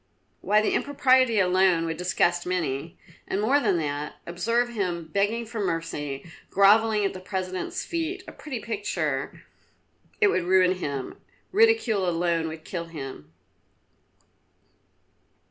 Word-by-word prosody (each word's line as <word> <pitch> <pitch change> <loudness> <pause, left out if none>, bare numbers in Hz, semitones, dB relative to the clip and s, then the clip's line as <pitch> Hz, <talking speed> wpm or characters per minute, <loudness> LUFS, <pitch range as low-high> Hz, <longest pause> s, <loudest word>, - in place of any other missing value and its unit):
Why, 210 +1 +3
the - - +1
impropriety 260 -5 +3
alone 185 -2 +3
would 165 0 -2
disgust 175 -1 +1
many. 165 -4 -2 0.3
And 195 - -1
more 255 +7 +3
than 205 -9 +1
that, 150 -2 -3
observe 230 +8 0
him 175 -8 -3
begging 210 +4 +1
for 230 0 -6
mercy, 155 -7 -3 0.2
grovelling 210 +2 +4
at 195 - -1
the 185 - -7
President's 185 - -4
feet, 340 +3 -3
a - - -7
pretty 270 -6 -6
picture! 175 -11 -3 0.8
It 420 - +5
would 180 - 0
ruin 185 0 +4
him; 140 -6 -5 0.3
ridicule 380 - +3
alone 170 -1 0
would 160 0 -8
kill 170 -2 -4
him." 135 - -8
185 Hz, 130 wpm, -26 LUFS, 165-225 Hz, 0.8 s, It